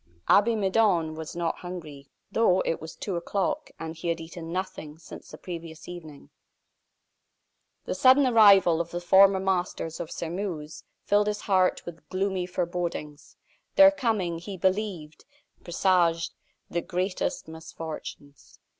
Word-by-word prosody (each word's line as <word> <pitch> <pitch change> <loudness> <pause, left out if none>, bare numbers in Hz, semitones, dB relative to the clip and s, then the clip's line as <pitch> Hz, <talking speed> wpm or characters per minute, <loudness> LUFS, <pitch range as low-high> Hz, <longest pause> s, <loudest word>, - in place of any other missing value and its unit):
Abbe 225 +3 +5
Midon 190 -5 +2
was 160 +1 -7
not 170 -1 -1
hungry, 155 -6 -9 0.2
though 190 -5 +3
it 165 - -2
was 160 - -8
two 190 -4 -4
o'clock, 185 +2 -2
and 160 0 -6
he 165 +2 -6
had 170 0 0
eaten 165 0 -8
nothing 170 -4 -5
since 160 - -12
the - - -10
previous 165 -3 -8
evening. 160 -5 -10 1.5
The - - -2
sudden 265 +2 +5
arrival 200 -8 +6
of 170 - -6
the 175 - -4
former 190 +2 +5
masters 180 -4 -2
of 165 - -5
Sairmeuse 165 -3 -5 0.2
filled 205 +1 +2
his 210 0 -2
heart 185 -2 +1
with 170 -1 -10
gloomy 185 -1 -1
forebodings. 170 -4 -4 0.4
Their 290 0 +9
coming, 215 -12 -1
he 190 +3 -7
believed, 185 -5 -2 0.4
presaged 175 -2 +1 0.3
the 170 - -2
greatest 185 0 -2
misfortunes. 160 -3 -9
175 Hz, 135 wpm, -27 LUFS, 165-195 Hz, 1.5 s, Their